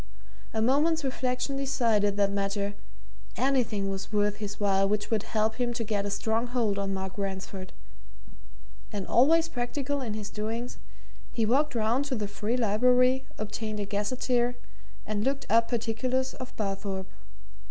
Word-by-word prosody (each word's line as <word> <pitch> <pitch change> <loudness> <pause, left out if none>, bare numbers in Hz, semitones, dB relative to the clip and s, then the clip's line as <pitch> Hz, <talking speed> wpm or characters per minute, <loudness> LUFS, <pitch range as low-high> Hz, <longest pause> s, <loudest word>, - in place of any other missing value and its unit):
A 220 -1 0
moment's 305 +6 +3
reflection 260 +1 -1
decided 230 -7 +2
that 200 -1 +3
matter 200 0 -1 0.6
anything 240 -6 +1
was 195 +1 -5
worth 205 -1 +2
his 205 -1 -5
while 195 -1 +3
which 210 +1 -1
would 220 -2 +2
help 220 0 0
him 245 -1 0
to 235 -1 -2
get 205 -2 -1
a - - -1
strong 225 +3 0
hold 230 -5 0
on 195 0 -1
Mark 190 0 -4
Ransford. 190 -1 -4 1.2
And 200 -2 -3
always 320 +7 +5
practical 275 +1 -2
in 225 -5 -3
his 210 -1 -5
doings, 225 +3 -3 0.5
he 230 -2 +1
walked 275 +5 +2
round 230 +5 +2
to 275 -2 -1
the 210 -3 -2
Free 210 +4 -1
Library, 250 +4 +4
obtained 215 0 -3
a 205 - -1
gazeteer, 240 +4 0 0.5
and 210 -1 -1
looked 275 +2 0
up 230 +1 +5
particulars 250 +3 0
of 255 - -7
Barthorpe. 195 -2 -2
220 Hz, 155 wpm, -29 LUFS, 205-250 Hz, 1.2 s, always